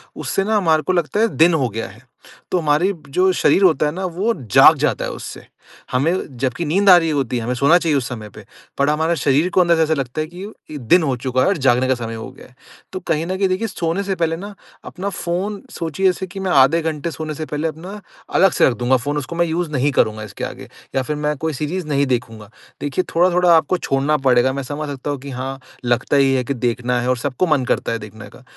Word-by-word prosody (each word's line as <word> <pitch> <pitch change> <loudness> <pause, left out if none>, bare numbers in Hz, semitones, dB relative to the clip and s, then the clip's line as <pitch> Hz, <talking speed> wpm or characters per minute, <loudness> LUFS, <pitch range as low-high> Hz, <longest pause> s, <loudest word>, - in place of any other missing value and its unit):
उससे 195 - -2
ना 215 +1 +1
हमारे 160 -5 +2
को 185 - 0
लगता 175 +4 0
है 225 - +4
दिन 165 +2 +5
हो 135 -7 +1
गया 115 +2 -5
है। - - -16 0.5
तो 180 - +2
हमारी 160 +5 +2 0.2
जो 185 +6 +2
शरीर 195 - +3
होता 165 -4 +4
है 150 - 0
ना 185 +3 -4
वो 190 +7 -1 0.2
जाग - - +7
जाता - - 0
है - - -4
उससे। - - -9 0.5
हमें 140 0 -1
जबकि 130 +6 -2
नींद 195 +6 +2
आ 180 - +10
रही 165 -2 +1
होती 135 -4 -1
है 115 - -3
हमें 125 - -2
सोना 140 +7 +5
चाहिए 160 -5 +1
उस 125 - -2
समय 110 -4 -7
पे 105 - -13 0.4
बट 140 - +3
हमारे 160 +3 +1
शरीर 145 +6 +2
को 185 - +3
अंदर 170 -1 +4
से 160 - +1
ऐसा 160 0 +1
लगता 135 +1 -3
है 155 - -3
कि 175 +3 -11 0.3
इ 150 - -5
दिन 165 +9 +3
हो 135 -4 0
चूका 130 +1 -1
है - - +3
और 195 -3 +1
जागने 130 0 +3
का 130 - +2
समय 115 -1 -6
हो 110 +3 -7
गया - - -15
है। 125 - -25 0.4
तो 185 - -3
कहीं 165 -2 -1
न 185 +2 -3
कहीं 195 -1 +2
देखिए 190 +5 -1
सोने 170 +1 -2
से 195 -1 -2
पहले 165 -2 0
ना 205 +3 -8 0.3
अपना 195 +2 -5
फ़ोन 190 +3 -3
सोचिए 170 +3 -3
जैसे 190 0 +1
कि 195 +2 -8
मैं 190 -1 -2
आधे 145 +3 +5
घंटे 160 +1 -3
सोने 155 -1 -5
से 155 - -5
पहले 150 +2 -2
अपना 180 +7 -7 0.4
अलग 195 -1 +5
से - - +3
रख - - -1
दूँगा 125 +1 +2
फ़ोन, 145 +4 -3
उसको 145 +4 -5
मैं 170 0 +2
यूज़ 165 -1 -2
नहीं 140 +1 +1
करूँगा 110 -3 +1
इसके 105 - -8
आगे - - -6 0.3
या 135 - +2
फ़िर 150 +4 -3
मैं 150 0 -1
कोई 160 +1 -2
सीरीज़ 155 +4 -4
नहीं 140 -1 +1
देखूँगा। 115 -4 -3 0.3
देखिए 145 +5 -1
थोड़ा-थोड़ा 180 0 +4
आपको 160 +3 +2
छोड़ना 140 0 0
पड़ेगा 125 +1 +4
मैं 140 0 -4
समझ 145 +3 -5
सकता 140 0 -5
हूँ 140 - -4
कि 140 +1 -9
हाँ, 135 +1 -5 0.3
लगता 120 +3 +1
ही 135 -1 +4
है 130 -1 +1
कि 140 - -2
देखना 125 0 -1
है 125 - -2
और 130 - +1
सबको 135 +7 -1
मन 140 -5 +1
करता - - -1
है 115 - -2
देखने 105 0 -11
का। 125 - -16
150 Hz, 255 wpm, -19 LUFS, 130-175 Hz, 0.5 s, आ